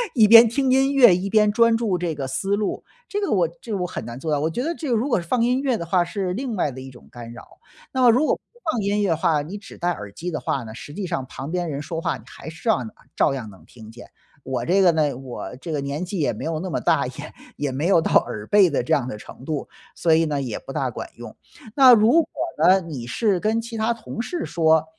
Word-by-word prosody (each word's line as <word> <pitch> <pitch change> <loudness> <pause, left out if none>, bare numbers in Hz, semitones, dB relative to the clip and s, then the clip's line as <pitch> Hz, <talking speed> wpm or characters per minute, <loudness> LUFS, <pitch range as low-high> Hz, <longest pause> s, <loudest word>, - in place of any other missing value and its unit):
一 220 -4 +6
边 230 +1 +9
听 265 +2 0
音 270 +2 +3
乐 245 -9 +7
一 190 +3 -3
边 210 -1 +4
专 230 +1 +4
注 225 -5 0
这 170 -3 -2
个 140 -2 -4
思 195 +10 -1
路， 210 -1 -3 0.2
这 410 - -3
个 400 - -1
我 - - +3
我 - - +2
这 230 - -8
个 - - 0
我 180 - -2
很 180 - -5
难 120 +1 -7
做 155 +2 -3
到， 145 - +1
我 155 +3 0
觉 240 +10 -3
得 330 +4 -1
这 315 -4 -6
个 240 - +2
如 230 +5 0
果 235 -10 +1
是 170 - -13
音 250 +3 +2
乐 260 -4 0
的 170 - -5
话 180 +1 +2
是 180 +1 -3
另 240 +1 -3
外 155 -6 0
的 130 0 -9
一 130 - -9
种 125 - -16
干 120 -1 -9
扰， - - -15 0.3
那 260 - -1
么 250 - +7
如 250 +7 +4
果 - - +2
不 - - -19 0.3
放 230 - -2
音 205 +1 0
乐 200 - +1
的 165 - +1
话， 155 -2 +1
你 170 +8 -7
只 205 - -13
戴 175 - -1
耳 105 - -7
机 175 - -5
的 155 - -3
话 135 - -2
呢， 110 -1 -9
实 145 +4 -10
际 200 -1 -4
上 170 -7 -3
旁 135 +4 -7
边 175 -1 -2
人 145 -1 -4
说 165 +2 -5
话 165 -5 -2
你 110 - -17
还 160 - -10
是 160 - -13
照 235 - 0
样 125 - -2
能 - - -11 0.2
照 - - +2
样 120 -6 -6
能 95 - -16
听 110 -2 -14
见。 120 +2 -13 0.3
我 130 -3 -3
这 195 +6 +3
个 180 - +6
呢， 150 -5 0
我 130 -1 -7
这 165 +5 -7
个 145 - -1
年 145 +6 -3
纪 185 +1 -4
也 150 - +1
没 - - -7
有 160 -1 -2
那 185 +3 -5
么 - - -1
大， 145 -5 +2
也 130 - -8 0.4
也 145 -1 -2
没 145 +6 -1
有 190 -4 +5
到 - - -2
耳 105 -1 -7
背 200 -3 +5
的 145 - -1
这 - - 0
样 130 -3 +1
的 105 - -5
程 120 - -13
度， 150 -1 -4 0.3
所 165 -2 +2
以 165 +1 +4
呢， 145 -2 -2
也 125 -5 -4
不 - - -10
大 - - -1
管 - - -7
用。 - - -10 0.4
那 260 -3 +8
如 220 +1 +5
果 - - -17 0.4
呢， 190 +1 +6
你 145 -8 -7
是 200 - 0
跟 220 +4 0
其 230 0 -7
他 225 +1 0
同 230 0 -6
事 335 +7 -4
说， 160 -2 +2
175 Hz, 310 characters per minute, -22 LUFS, 140-220 Hz, 0.4 s, 边